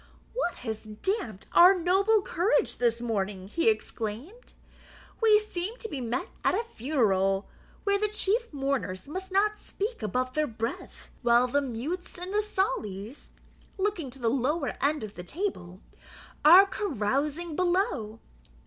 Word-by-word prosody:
"What 460 -7 -1
has 220 -2 -3
damped 215 - -3
our 360 +3 +8
noble 385 +5 +3
courage 375 +7 +1
this 235 -1 +1
morning?" 200 -5 -2
he 335 - +2
exclaimed. 285 - -4 0.7
"We 435 -2 +6
seem 425 +1 -4
to 450 - -6
be 285 -10 -5
met 240 +2 -2
at - - +3
a - - -1
funeral, 210 - +1 0.4
where 400 0 +2
the 425 - +2
chief 425 +3 0
mourners 270 -10 -2
must 375 +5 -6
not 420 +2 +2
speak 425 - -4
above 255 +5 -1
their 305 0 +1
breath, 230 -1 -6
while 240 0 +4
the 280 +3 +1
mutes 280 +10 -4
and 360 +2 -6
the 420 - +3
saulies 235 - -3 0.5
(looking 380 -7 -1
to 260 - -12
the 240 -3 -2
lower 275 +5 0
end 285 -1 +1
of 210 -1 -7
the 180 - -8
table) 190 - -4 0.6
are 355 +6 +9
carousing 300 - -2
below. 350 - 0
295 Hz, 145 wpm, -28 LUFS, -, 0.7 s, are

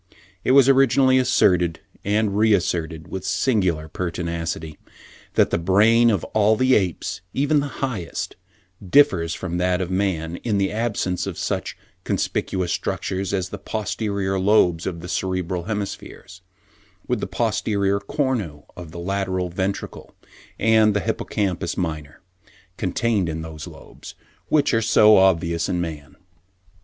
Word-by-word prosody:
It 130 - +2
was 135 -1 +7
originally 130 -1 +4
asserted 90 -9 +2 0.2
and 105 0 0
re 110 +1 +4
asserted, 85 -3 -3
with 95 -1 -5
singular 95 -11 0
pertinacity, 85 -2 -4 0.6
that - - +3
the - - +1
brain 110 +7 +4
of 100 -6 0
all 110 0 +4
the 130 +3 +3
apes, 95 -7 0
even 145 +2 +2
the 145 - -2
highest, 125 -11 -4 0.5
differs 90 - +3
from 90 -2 -4
that 90 0 +1
of 95 -1 -3
man, 90 -3 -1
in 110 -4 -1
the 100 -1 +1
absence 105 -5 -2
of - - -5
such - - -3 0.3
conspicuous 90 -2 -1
structures 95 +3 -3
as 95 -2 -1
the 100 - -7
posterior 100 -2 -2
lobes 95 -4 +3
of 85 -2 -4
the 90 - -8
cerebral 90 -1 -2
hemispheres, 100 -3 -6 0.7
with - - 0
the - - -3
posterior 100 -1 0
cornu 100 - -2
of 90 -2 -9
the 80 - -10
lateral 95 0 -2
ventricle 95 +3 -4 0.4
and 110 -2 +4
the - - +3
hippocampus 95 +2 -2
minor, 75 -4 -4 0.5
contained 100 -1 0
in 80 0 -4
those 80 -2 -8
lobes, - - -12 0.3
which 145 -3 +2
are 115 - +3
so 110 -1 +6
obvious 85 -3 +2
in 90 - 0
man. 80 -4 -6
95 Hz, 140 wpm, -22 LUFS, 85-110 Hz, 0.7 s, was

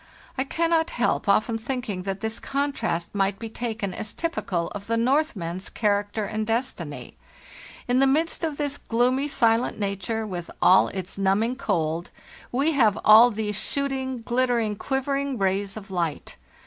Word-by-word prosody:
I 265 - 0
cannot 330 +2 +1
help 240 -6 0
often 225 +3 +2
thinking 240 -5 -3
that 195 0 -3
this 220 +1 -2
contrast 275 -11 -2
might 195 -1 +1
be 225 +1 -6
taken 220 -3 -3
as_ 210 +2 -5
typical 195 - -2
of 200 -1 -8
the 230 0 +1
Northman's 230 - 0
character 205 0 0
and 215 +1 -3
destiny. 170 - -3 0.7
In 250 +1 +3
the 270 - +5
midst 320 +5 +1
of 310 -3 -1
this 285 -1 -2
gloomy, 250 +4 +1
silent 230 -5 +2
nature, 205 +2 -2
with 180 -4 -5
all 185 - +6
its 190 0 -5
numbing 210 +6 +1
cold, 170 -7 -1 0.4
we 275 +6 +2
have 225 -9 +3
all 220 +3 +9
these 210 -2 -2
shooting, 265 -3 -2
glittering, 240 -3 +1
quivering 275 +2 -1
rays 195 0 0
of 200 -2 -10
light. 170 -5 -3
225 Hz, 150 wpm, -25 LUFS, 200-265 Hz, 0.7 s, all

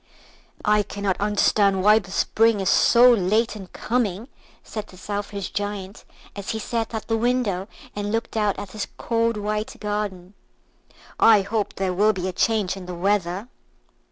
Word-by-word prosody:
"I 210 0 +4
cannot 200 -1 -3
understand 200 -2 +2
why 210 +2 +6
the 190 -3 -12
Spring 225 +3 +2
is 190 - 0
so 245 +1 +6
late 220 +2 +2
in 195 -3 -9
coming," 225 +1 -2 0.3
said 215 -1 -6
the 185 - -15
Selfish 200 0 -5
Giant, 205 -1 -5 0.3
as 200 -1 -7
he 220 - -1
sat 225 +1 -3
at 220 - -5
the 225 - +1
window 225 -5 0 0.3
and 205 0 -3
looked 225 +1 -2
out 210 -2 +1
at 200 -1 -7
his 215 -2 -4
cold 230 -1 0
white 210 +1 -3
garden; 205 -3 -4 0.9
"I 215 -3 +6
hope 210 +1 -2
there 190 -1 -1
will 210 +4 +3
be 185 -1 -3
a 185 - -3
change 210 -1 +1
in 185 -2 -9
the 180 - -5
weather." 190 +2 0
205 Hz, 165 wpm, -23 LUFS, 195-220 Hz, 0.9 s, why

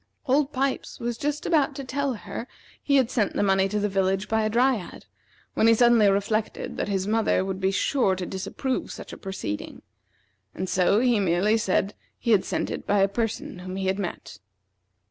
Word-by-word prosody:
Old 280 +2 +2
Pipes 270 -1 -2
was 240 0 -2
just 295 +4 -3
about 300 -4 +2
to 275 - -5
tell 270 0 -2
her - - -10
that 240 - -4 0.3
he 280 - +1
had 260 -3 +3
sent 215 -5 0
the - - 0
money 195 -1 +3
to 210 +1 -1
the 205 - +1
village 195 0 0
by 220 0 +1
a 215 - +1
Dryad, 240 -3 0 0.5
when 225 - +3
he 230 - +6
suddenly 235 -3 +5
reflected 205 +2 -1
that - - -2
his 195 -2 -1
mother 215 -3 +1
would 190 0 -4
be 190 - +2
sure 195 0 +1
to 185 -1 -4
disapprove 220 +8 -3
such - - -9
a - - -8
proceeding, 190 - -6 0.7
and 185 - -3
so 190 +4 +3
he 245 -4 +3
merely 190 +3 +2
said 195 -2 0 0.2
he 235 - -1
had 205 -4 +5
sent - - -2
it - - -6
by 205 - +2
a 195 - +5
person 220 -2 -3
whom 185 +1 -6
he 190 0 -3
had 190 +1 0
met. 185 -3 -6
210 Hz, 205 wpm, -25 LUFS, 190-245 Hz, 0.7 s, he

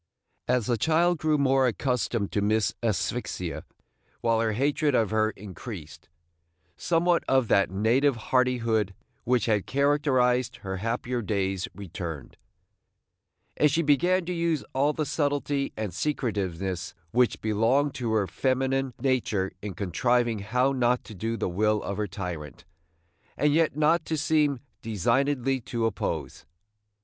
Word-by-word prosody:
As 125 -3 +2
the 120 -1 0
child 165 +5 +2
grew 155 -1 +2
more 135 -2 +3
accustomed 120 -4 -1
to 100 - 0
Miss 105 +1 +1
Asphyxia, 110 -6 -2 0.6
while 115 -1 +2
her 110 -1 +1
hatred 145 +4 +1
of 110 -4 +2
her 110 0 +2
increased, 95 - -9 0.7
somewhat 170 - +2
of 130 -3 +2
that 100 - +4
native 120 +8 +2
hardihood 115 -4 +1 0.3
which 125 0 +2
had 105 -5 +1
characterized 130 -3 +2
her 95 0 -3
happier 120 +4 -2
days 95 -3 -1
returned; 85 -7 -7 1.2
and 150 - +4
she 165 +4 +1
began 175 +5 +3
to 180 - -2
use 170 -3 0
all 140 +3 +2
the 155 0 -2
subtlety 145 -2 -1
and 105 -5 -3
secretiveness 95 - -2 0.2
which 125 0 +2
belonged 115 +7 +2
to 120 -3 -3
her 105 -2 +2
feminine 130 +5 0
nature 115 -8 0
in 100 -3 -6
contriving 120 +4 +1
how 125 +7 +1
not 125 -2 +1
to 110 - -11
do 115 +4 -3
the - - -1
will 105 +4 +1
of 100 - -4
her 105 -1 -1
tyrant, 90 -8 -6 0.7
and 145 +2 +3
yet 155 -2 +2
not 160 +2 +3
to 160 - -2
seem 150 -3 +1 0.2
designedly 130 +5 0
to 115 0 -2
oppose. 115 - -3
120 Hz, 140 wpm, -27 LUFS, 105-140 Hz, 1.2 s, that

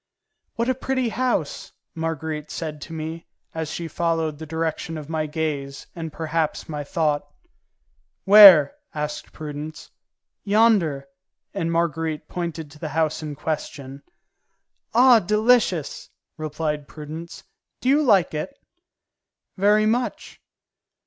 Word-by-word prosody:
"What 235 +1 -1
a 260 - +3
pretty 260 -1 -1
house!" 225 - -2 0.2
Marguerite 160 -2 -4
said 155 -3 -5
to 165 - -9
me, 160 +1 -6 0.3
as 160 -2 -4
she 165 +1 -4
followed 165 -2 -1
the 160 - -7
direction 160 0 -3
of 155 0 -8
my 155 -1 -1
gaze 145 -3 -3
and 165 -2 -5
perhaps 160 0 -2
of - - -23
my 150 -2 -4
thought. 145 -1 -1 1.0
"Where?" 195 - +9 0.2
asked 150 0 -4
Prudence. 150 0 -8 0.5
"Yonder," 200 -10 +3 0.5
and 165 0 -2
Marguerite 160 -2 -1
pointed 165 -4 -5
to 150 - -15
the 155 - -4
house 155 +1 0
in 150 -2 -5
question. 140 -2 -5 0.9
"Ah, 245 -1 +7
delicious!" 210 - +1 0.3
replied 150 -2 -3
Prudence. 155 +3 -9 0.4
"Do - - -4
you 285 +3 +5
like 200 - +3
it?" 155 - -5 1.0
"Very 210 +2 +3
much." 240 +3 -2
160 Hz, 120 wpm, -23 LUFS, 150-190 Hz, 1.0 s, Where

